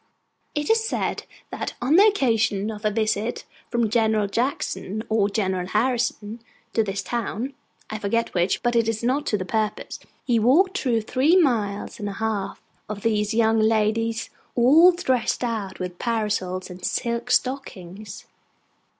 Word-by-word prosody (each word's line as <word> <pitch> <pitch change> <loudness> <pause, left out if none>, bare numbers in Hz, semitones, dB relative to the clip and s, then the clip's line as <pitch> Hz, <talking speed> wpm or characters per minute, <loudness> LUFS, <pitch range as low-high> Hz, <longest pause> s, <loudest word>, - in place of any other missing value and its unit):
It 295 +8 0
is 450 0 +3
said 445 - -2 0.3
that - - -4
on 260 +6 +2
the 400 +4 +8
occasion 225 - +1
of 210 0 -9
a - - +4
visit 215 +1 -1 0.2
from 235 -2 +1
General 220 -1 +2
Jackson 220 -2 -2
or 215 -2 +2
General 190 -4 -1
Harrison 225 0 -1 0.3
to 225 - +3
this 200 -2 -3
town 240 +2 -3 0.3
(I 215 - -5
forget 230 +3 -1
which, 180 +1 0
but 240 -1 +1
it 230 -1 +3
is 225 0 -3
not 265 +5 0
to 210 - +1
the 185 - -4
purpose), 215 +2 -2 0.3
he 240 -3 +2
walked 360 - +3
through 235 -4 +1
three 265 +9 +2
miles 230 - +1
and 205 -1 -3
a - - -5
half 205 -2 -3 0.3
of 205 -1 -6
these 215 -1 +1
young 225 -1 +3
ladies 225 +1 +1 0.2
all 295 +9 +7
dressed 260 -10 0
out 215 -5 -3
with 180 -1 -6
parasols 210 -6 -2
and 180 0 -11
silk 235 +5 -2
stockings. 215 -6 -2
225 Hz, 155 wpm, -24 LUFS, 205-245 Hz, 0.3 s, the